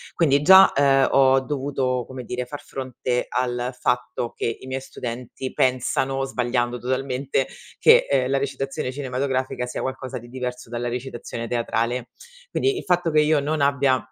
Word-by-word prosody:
Quindi 145 Hz, -4 st, +3 dB
già, 190 Hz, +3 st, +9 dB
ehm, 135 Hz, -1 st, +4 dB
ho 135 Hz, -1 st, +5 dB
dovuto, 130 Hz, -3 st, -2 dB
come 130 Hz, -1 st, -7 dB
dire, 125 Hz, +1 st, -4 dB
far 145 Hz, +3 st, -8 dB
fronte 130 Hz, -2 st, -3 dB
al 125 Hz, 0 st, -2 dB
fatto 125 Hz, -1 st, -1 dB
che 115 Hz, -, -2 dB
i 130 Hz, -, -10 dB
miei 130 Hz, 0 st, -3 dB
studenti 125 Hz, 0 st, -6 dB
pensano, 130 Hz, +1 st, +1 dB
sbagliando 120 Hz, -2 st, -1 dB
totalmente, 130 Hz, +1 st, -1 dB, 0.3 s
che, -, -, +6 dB
ehm, 130 Hz, -2 st, +2 dB
la 135 Hz, -, +2 dB
recitazione 135 Hz, -1 st, -3 dB
cinematografica 130 Hz, -1 st, -2 dB
sia -, -, -4 dB
qualcosa 130 Hz, -1 st, -4 dB
di 120 Hz, -, -13 dB
diverso 125 Hz, -2 st, -5 dB
dalla 120 Hz, 0 st, -3 dB
recitazione 120 Hz, -1 st, -5 dB
teatrale. 120 Hz, +1 st, -1 dB, 0.4 s
Quindi, 400 Hz, -1 st, +1 dB
il -, -, -5 dB
fatto 175 Hz, -2 st, +1 dB
che 155 Hz, 0 st, +5 dB
io 150 Hz, 0 st, +3 dB
non 150 Hz, +1 st, -1 dB
abbia 140 Hz, -2 st, +3 dB
130 Hz, 155 wpm, -23 LUFS, 125-135 Hz, 0.4 s, già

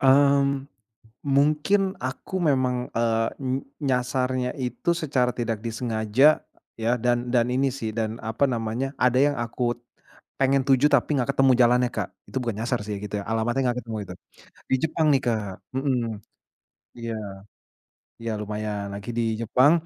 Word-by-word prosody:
Mmm. 140 Hz, 0 st, +4 dB, 0.5 s
Mungkin, 150 Hz, +8 st, +2 dB, 0.2 s
aku 130 Hz, +7 st, -6 dB, 0.2 s
memang 130 Hz, -2 st, +2 dB, 0.2 s
eee, 115 Hz, -1 st, +2 dB, 0.2 s
n 130 Hz, +1 st, 0 dB, 0.3 s
nyasarnya 125 Hz, 0 st, 0 dB
itu 125 Hz, +7 st, -2 dB
secara 130 Hz, -5 st, +1 dB
tidak 115 Hz, -2 st, -1 dB
disengaja, 115 Hz, +1 st, +1 dB, 0.5 s
ya. 115 Hz, -, 0 dB
Dan 120 Hz, 0 st, +1 dB
dan 120 Hz, 0 st, +3 dB
ini 135 Hz, +2 st, +2 dB
sih, 110 Hz, -1 st, -3 dB
dan 110 Hz, 0 st, -2 dB
apa 110 Hz, +5 st, +1 dB
namanya. 120 Hz, +3 st, -2 dB
Ada 125 Hz, 0 st, +3 dB
yang -, -, -4 dB
aku 120 Hz, +1 st, -1 dB, 0.6 s
pengen 135 Hz, 0 st, +3 dB
tuju, 135 Hz, +2 st, +5 dB
tapi 140 Hz, 0 st, +3 dB
enggak 130 Hz, +1 st, +1 dB
ketemu 135 Hz, -1 st, +5 dB
jalannya, 125 Hz, +1 st, +4 dB
Kak. -, -, -2 dB, 0.2 s
Itu -, -, -4 dB
bukan 115 Hz, -4 st, -2 dB
nyasar 125 Hz, -1 st, 0 dB
sih, 105 Hz, -, -2 dB
gitu 105 Hz, 0 st, -3 dB
ya. -, -, -8 dB
Alamatnya 115 Hz, +4 st, 0 dB
enggak 125 Hz, +1 st, -1 dB
ketemu, 110 Hz, -2 st, -5 dB
itu. 90 Hz, -, -7 dB, 0.6 s
Di 130 Hz, -, +4 dB
Jepang 160 Hz, 0 st, +1 dB
nih 135 Hz, -, +3 dB
Kak 110 Hz, -3 st, 0 dB, 0.3 s
mhm, 135 Hz, -2 st, +1 dB, 1.0 s
iya. 115 Hz, -1 st, -4 dB, 1.1 s
Iya 115 Hz, -, -2 dB
lumayan. 105 Hz, -1 st, -3 dB
Lagi 100 Hz, +3 st, -6 dB
di 120 Hz, -, +2 dB, 0.2 s
Jepang, 130 Hz, +6 st, +4 dB
125 Hz, 150 wpm, -25 LUFS, 115-135 Hz, 1.1 s, tuju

